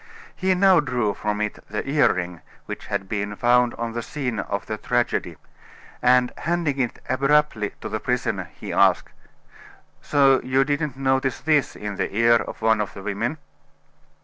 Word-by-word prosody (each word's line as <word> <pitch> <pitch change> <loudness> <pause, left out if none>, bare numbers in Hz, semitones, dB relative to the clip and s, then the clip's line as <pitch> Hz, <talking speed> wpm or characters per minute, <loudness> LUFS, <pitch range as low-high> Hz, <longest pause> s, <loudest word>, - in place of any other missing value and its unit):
He 185 0 +1
now 190 -1 +5
drew 125 -8 0
from 105 +1 -2
it 105 -1 -3
the 105 - -4
earring 90 - +1 0.2
which - - -7
had 95 - -3
been 105 0 -3
found 120 +1 +3
on 115 -1 -4
the 120 - -3
scene 125 -3 -4
of 100 +2 -3
the 110 - -3
tragedy, 120 -1 -1 0.6
and 125 0 +4
handing 165 -5 -1
it 125 -3 -1
abruptly 140 -5 +1
to - - -4
the 110 0 -3
prisoner, 125 +1 -2
he - - -7
asked: - - +3 0.9
"So 135 - +4
you 130 +1 +2
didn't 145 -1 -2
notice 135 -1 0
this 155 -3 +1
in 105 -1 -6
the - - -2
ear 115 0 +5
of 110 - -7
one 110 -1 +3
of 105 - -5
the 95 - -9
women?" 110 +8 -2
125 Hz, 165 wpm, -23 LUFS, 105-140 Hz, 0.9 s, now